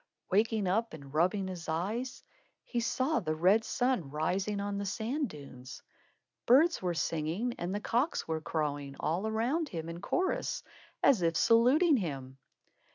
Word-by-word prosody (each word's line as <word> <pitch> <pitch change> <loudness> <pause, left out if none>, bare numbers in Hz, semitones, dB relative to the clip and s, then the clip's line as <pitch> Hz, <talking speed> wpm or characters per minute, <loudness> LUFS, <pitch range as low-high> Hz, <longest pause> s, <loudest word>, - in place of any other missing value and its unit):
Waking 215 +1 +2
up 220 +2 0
and 140 -2 -12
rubbing 185 +5 +1
his 175 -3 -6
eyes, 210 +11 -2 0.4
he 240 - -2
saw 260 +6 +1
the 155 -2 -2
red 190 +7 +4
sun 245 - 0
rising 190 +7 -1
on 200 0 -2
the 200 - -3
sand 240 +7 -2
dunes. 135 -4 -11 0.6
Birds 305 +8 +5
were 180 -2 -1
singing 165 +9 -1
and 175 +1 -2
the - - -1
cocks 245 +9 0
were 160 -1 -2
crowing 145 -3 -3
all 180 +7 -1
around 250 +9 0
him, 165 -1 -5
in 170 +1 -7
chorus, 370 +1 -1 0.4
as 255 -9 +5
if 165 -1 +1
saluting 265 +8 +5
him. 135 - -5
195 Hz, 155 wpm, -31 LUFS, 160-235 Hz, 0.6 s, Birds